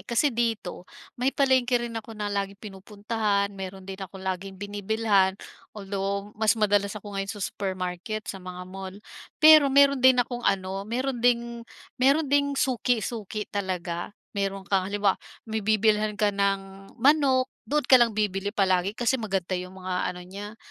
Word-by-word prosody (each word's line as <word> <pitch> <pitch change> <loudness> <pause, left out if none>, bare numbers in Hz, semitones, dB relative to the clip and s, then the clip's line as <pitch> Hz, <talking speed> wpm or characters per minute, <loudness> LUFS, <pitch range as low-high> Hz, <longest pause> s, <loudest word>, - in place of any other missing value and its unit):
kasi 245 +3 +2
dito 225 -6 -2 0.3
may 255 - +2
palengke 260 -3 +3
rin 240 -1 -3
ako 225 0 -7
na 205 -1 -3
laging 200 0 -2
pinupuntahan, 205 0 -2
meron 190 -1 -7
din 190 +1 -8
akong 190 0 -8
laging 190 +1 -4
binibilhan. 205 -1 +1 0.4
Although, 200 +1 -3
mas 220 0 +2
madalas 205 -1 +1
ako 205 0 -9
ngayon 195 0 -3
sa 205 -2 -4
supermarket, 185 +2 -4
sa 195 - -6
mga 180 0 -8
mall. 190 +1 -8 0.4
Pero 310 -2 +8
meron 280 -1 +5
din 260 0 +6
akong 245 0 0
ano, 195 -2 0
meron 255 +1 -2
ding 235 -1 +1 0.4
meron 280 +5 +4
ding 285 0 +1
suki-suki 230 -5 -1
talaga. 185 -2 -3 0.2
Meron 195 -1 -2
kang 190 -2 0
halimbawa, 200 -1 +1 0.2
may 220 -1 -3
bibilhan 215 0 +2
ka 210 -1 +2
ng 195 -1 -2
manok, 265 0 +3 0.2
doon 295 0 +1
ka 255 -1 +7
lang 230 -3 +3
bibili 200 -2 0
palagi 195 -1 +1
kasi 245 +1 +1
maganda 195 -4 -2
'yong 180 +1 -4
mga 185 -1 -2
ano 180 0 -6
niya, 205 +4 -8
205 Hz, 155 wpm, -26 LUFS, 195-235 Hz, 0.4 s, Pero